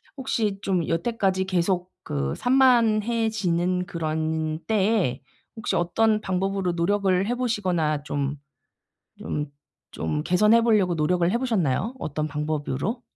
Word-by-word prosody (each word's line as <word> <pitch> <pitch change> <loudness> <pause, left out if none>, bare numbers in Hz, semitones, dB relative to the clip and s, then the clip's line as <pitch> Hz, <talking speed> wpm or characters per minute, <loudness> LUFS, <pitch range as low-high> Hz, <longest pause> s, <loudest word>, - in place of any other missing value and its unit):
혹시 225 -7 -1
좀 185 -5 0
여태까지 190 +1 0
계속 185 0 0
그 70 -1 -2
산만해지는 220 -8 +2
그런 160 -3 -2
때에 205 - +1 0.4
혹시 220 - -2
어떤 215 +5 +2
방법으로 190 -1 -1
노력을 190 +2 +1
해 245 - 0
보시거나 180 - 0
좀 145 -1 -2 0.8
좀 150 0 -3 0.4
좀 150 0 -2
개선해 210 +7 +4
보려고 210 -6 +3
노력을 170 +2 +1
해 235 - +1
보셨나요 220 - 0
어떤 155 - -3
방법으로? 150 - -3
185 Hz, 265 characters per minute, -25 LUFS, 160-220 Hz, 0.8 s, 개선해